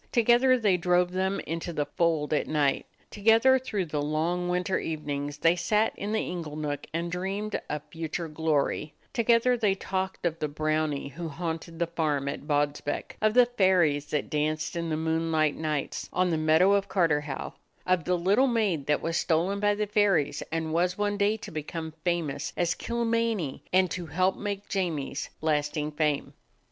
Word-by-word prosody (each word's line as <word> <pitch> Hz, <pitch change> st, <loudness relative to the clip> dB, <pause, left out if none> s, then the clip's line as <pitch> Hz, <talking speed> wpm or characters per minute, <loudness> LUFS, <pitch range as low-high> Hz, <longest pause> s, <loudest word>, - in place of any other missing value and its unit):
Together 245 Hz, +2 st, +4 dB
they 205 Hz, -6 st, +2 dB
drove 180 Hz, 0 st, +2 dB
them 190 Hz, +1 st, 0 dB
into 165 Hz, +2 st, -4 dB
the 150 Hz, -3 st, -1 dB
fold 160 Hz, -3 st, 0 dB
at 150 Hz, -, +1 dB
night; 145 Hz, -3 st, +1 dB, 0.2 s
together 225 Hz, +5 st, +4 dB
through 210 Hz, -7 st, -2 dB
the 150 Hz, -2 st, -2 dB
long 165 Hz, +4 st, -1 dB
winter 180 Hz, +1 st, 0 dB
evenings 145 Hz, -2 st, -4 dB
they 165 Hz, +3 st, +4 dB
sat 210 Hz, +6 st, +1 dB
in 205 Hz, -, -4 dB
the 220 Hz, -, +1 dB
ingle 165 Hz, -4 st, -5 dB
nook 150 Hz, -2 st, -4 dB
and 170 Hz, +1 st, -2 dB
dreamed 195 Hz, +4 st, -3 dB
of 150 Hz, -1 st, -3 dB
future 165 Hz, +1 st, -4 dB
glory; 155 Hz, -1 st, -1 dB, 0.2 s
together 235 Hz, +1 st, +3 dB
they 210 Hz, -5 st, +1 dB
talked 190 Hz, -1 st, -3 dB
of 165 Hz, -1 st, -1 dB
the 150 Hz, -, -1 dB
brownie 155 Hz, -1 st, -1 dB
who 165 Hz, +4 st, -6 dB
haunted 165 Hz, +1 st, -5 dB
the 170 Hz, -, +1 dB
farm 155 Hz, -4 st, -1 dB
at 140 Hz, +1 st, -5 dB
Bodsbeck, 145 Hz, 0 st, -1 dB
of 215 Hz, +1 st, +2 dB
the 250 Hz, -1 st, +7 dB
fairies 185 Hz, -11 st, +2 dB
that 150 Hz, -, -1 dB
danced 155 Hz, +2 st, -1 dB
in 170 Hz, -1 st, -2 dB
the 155 Hz, -, 0 dB
moonlight 160 Hz, -1 st, +1 dB
nights 155 Hz, -3 st, -3 dB
on 180 Hz, -1 st, +1 dB
the -, -, +2 dB
meadow 160 Hz, +5 st, +4 dB
of 200 Hz, 0 st, +2 dB
Carterhaugh, 150 Hz, -6 st, 0 dB, 0.3 s
of 185 Hz, -2 st, +2 dB
the 180 Hz, 0 st, +1 dB
little 200 Hz, +10 st, +3 dB
maid 205 Hz, -, 0 dB
that 150 Hz, -, +1 dB
was 165 Hz, 0 st, 0 dB
stolen 180 Hz, +5 st, +1 dB
by 205 Hz, 0 st, +2 dB
the 210 Hz, +1 st, -1 dB
fairies 200 Hz, -9 st, +2 dB
and 160 Hz, -1 st, -2 dB
was 180 Hz, +2 st, +1 dB
one 205 Hz, 0 st, 0 dB
day 205 Hz, +2 st, +2 dB
to 220 Hz, -, -9 dB
become 160 Hz, +1 st, -5 dB
famous 160 Hz, -5 st, -1 dB
as 170 Hz, -1 st, +2 dB
"Kilmeny," 230 Hz, -, -1 dB
and 185 Hz, -1 st, +3 dB
to 175 Hz, -3 st, -4 dB
help 185 Hz, +5 st, +1 dB
make 205 Hz, -1 st, -4 dB
Jamie's 165 Hz, -8 st, -2 dB
lasting 150 Hz, -1 st, 0 dB
fame. 150 Hz, -1 st, -1 dB
170 Hz, 175 wpm, -28 LUFS, 155-195 Hz, 0.3 s, the